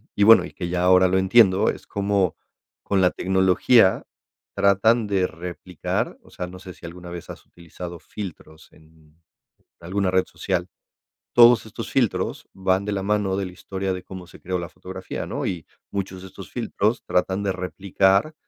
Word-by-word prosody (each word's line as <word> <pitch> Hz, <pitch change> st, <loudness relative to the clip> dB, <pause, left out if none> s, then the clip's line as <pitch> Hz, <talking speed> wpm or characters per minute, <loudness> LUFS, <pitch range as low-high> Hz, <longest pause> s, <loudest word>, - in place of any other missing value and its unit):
y 105 Hz, -, +3 dB
bueno, 105 Hz, -4 st, +8 dB
y -, -, -11 dB
que 90 Hz, -2 st, -5 dB
ya 90 Hz, 0 st, -1 dB
ahora 90 Hz, 0 st, +6 dB
lo 95 Hz, +1 st, +2 dB
entiendo. 95 Hz, 0 st, +5 dB
Es -, -, -5 dB
como 100 Hz, -4 st, 0 dB, 0.5 s
con 100 Hz, -1 st, +1 dB
la 90 Hz, -, +4 dB
tecnología 95 Hz, +3 st, +3 dB, 0.5 s
tratan 110 Hz, +4 st, +3 dB
de 95 Hz, -3 st, +1 dB
replicar. 90 Hz, 0 st, -4 dB
O -, -, -19 dB
sea, 90 Hz, -, -5 dB
no 90 Hz, +1 st, -10 dB
sé 90 Hz, 0 st, -10 dB
sí -, -, -14 dB
alguna 90 Hz, +1 st, -9 dB
vez 85 Hz, -1 st, -8 dB
has -, -, -10 dB
utilizado 85 Hz, 0 st, -10 dB
filtros 85 Hz, -6 st, -9 dB
en 80 Hz, 0 st, -23 dB, 0.6 s
alguna 95 Hz, +2 st, -1 dB
red 95 Hz, 0 st, +3 dB
social. 90 Hz, -2 st, -3 dB, 0.6 s
Todos 120 Hz, -2 st, +7 dB
estos 115 Hz, +1 st, -7 dB
filtros 125 Hz, -5 st, 0 dB
van 95 Hz, 0 st, +1 dB
de 105 Hz, -, -2 dB
la 95 Hz, -1 st, -2 dB
mano 100 Hz, -1 st, 0 dB
de 100 Hz, -, -1 dB
la 90 Hz, -, -7 dB
historia 95 Hz, +1 st, -4 dB
de 90 Hz, -, -5 dB
cómo 95 Hz, -2 st, -9 dB
se 85 Hz, -, -16 dB
creó 90 Hz, +1 st, -2 dB
la 85 Hz, -2 st, -5 dB
fotografía, -, -, -7 dB
¿no? -, -, -3 dB
Y 85 Hz, -4 st, -4 dB, 0.2 s
muchos 95 Hz, -2 st, -4 dB
de 95 Hz, -, -9 dB
estos -, -, -11 dB
filtros -, -, -1 dB
tratan 95 Hz, +2 st, 0 dB
de 100 Hz, -, 0 dB
replicar, 95 Hz, -, +1 dB
95 Hz, 180 wpm, -23 LUFS, 90-100 Hz, 0.6 s, bueno